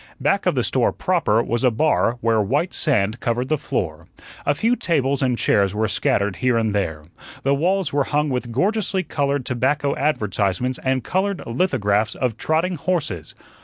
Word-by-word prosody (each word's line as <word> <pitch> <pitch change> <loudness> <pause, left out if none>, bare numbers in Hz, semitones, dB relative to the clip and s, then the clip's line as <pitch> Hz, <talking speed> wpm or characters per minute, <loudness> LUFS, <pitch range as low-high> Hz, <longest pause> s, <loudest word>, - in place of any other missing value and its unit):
Back - - +1
of - - +2
the - - +1
store - - +1
proper 110 +3 +1
was 120 +1 -2
a 125 - +5
bar 120 -1 +1
where 115 -1 +2
white 145 - 0
sand 110 -6 0
covered 120 +1 -1
the 155 - +2
floor. 80 - -3 0.4
A 145 - +3
few 230 +10 +2
tables 140 - 0
and 125 -3 +1
chairs 100 -3 +2
were 110 +1 +1
scattered 100 -1 0
here 125 -2 +1
and 110 -2 0
there. 80 -7 -2 0.4
The 140 - +2
walls 180 +3 0
were 140 -1 +2
hung 150 +1 0
with 125 -2 -3
gorgeously 190 - 0
colored 140 -4 -1
tobacco 140 +3 0
advertisements 110 -3 0
and 130 -1 0
colored 190 +1 -1
lithographs 115 - 0
of 125 -4 -1
trotting 165 +7 0
horses. 145 - -3
130 Hz, 170 wpm, -21 LUFS, 110-150 Hz, 0.4 s, a